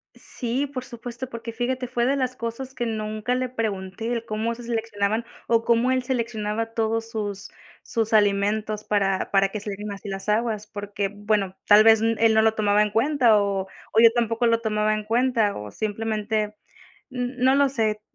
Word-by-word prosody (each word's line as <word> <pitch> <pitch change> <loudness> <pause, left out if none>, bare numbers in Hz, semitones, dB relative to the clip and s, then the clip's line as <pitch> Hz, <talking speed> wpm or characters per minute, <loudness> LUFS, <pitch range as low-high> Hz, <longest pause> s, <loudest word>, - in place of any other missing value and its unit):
Sí, 250 +3 -3
por 260 -2 -6
supuesto, 245 +1 -7
porque 230 -1 -6
fíjate, 250 +2 -2
fue 240 -1 0
de 270 +2 +2
las 255 -2 -2
cosas 235 +3 -5
que 240 - -3
nunca 215 +2 -2
le 255 -1 -1
pregunté, 220 -1 -3
el 230 -1 -2
cómo 220 +1 -2
se 240 - -10
seleccionaban 225 -1 -1 0.2
o 230 -1 +2
cómo 235 +2 +3
él 260 -1 +1
seleccionaba 225 -3 -2
todos 225 0 -1
sus 205 -3 -4 0.3
sus 225 -2 -1
alimentos 210 +1 +2
para 195 -2 0
para 195 0 +3
que 215 - -5
salieran 205 0 -5
así 200 +1 -8
las 195 +1 -5
aguas, 215 -1 0
porque 205 -1 -4
bueno, 205 -2 -1
tal 210 +1 +8
vez, 225 -1 +7
n 225 0 +2
él 225 -1 +4
no 220 - +5
lo 220 0 +3
tomaba 210 -1 +2
en 210 - +1
cuenta 235 -1 +4
o 200 -1 0
o 205 +3 -3
yo 230 - +9
tampoco 235 0 +1
lo 230 0 +2
tomaba 215 -1 +1
en 215 - -2
cuenta 230 -1 +1
o 105 0 -7
simplemente 215 - -2 0.5
n 250 0 -4
no 260 +2 +4
lo 280 -1 +4
sé, 220 -4 -1
225 Hz, 190 wpm, -24 LUFS, 210-235 Hz, 0.5 s, yo